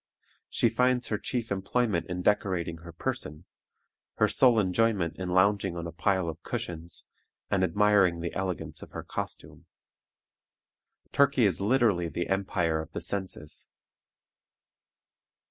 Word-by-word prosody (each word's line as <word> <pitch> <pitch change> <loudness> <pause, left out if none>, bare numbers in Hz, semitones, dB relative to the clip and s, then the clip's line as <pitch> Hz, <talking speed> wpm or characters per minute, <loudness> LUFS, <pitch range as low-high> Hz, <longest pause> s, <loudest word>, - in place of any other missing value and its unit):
She - - +2
finds 125 +1 +1
her 105 - -1
chief 115 +1 -3
employment 100 -1 0
in 90 0 -3
decorating 90 -5 +1
her 85 +1 -11
person, 75 -1 -4 0.7
her - - +3
sole 125 -4 +4
enjoyment 95 -3 +1
in 90 -1 -3
lounging 95 0 +2
on 85 - -4
a 85 - -5
pile 95 +1 0
of 80 +1 -5
cushions, 85 -8 -5 0.5
and 95 -1 +2
admiring 100 -3 +3
the 85 0 -4
elegance 95 -3 -3
of - - -10
her - - -5
costume. - - -6 1.4
Turkey 140 -4 +4
is 95 -2 +1
literally 105 -6 +2
the 85 +1 -3
empire 90 -4 0
of 80 +1 -10
the - - -4
senses. 90 -4 -5
95 Hz, 130 wpm, -28 LUFS, 85-105 Hz, 1.4 s, sole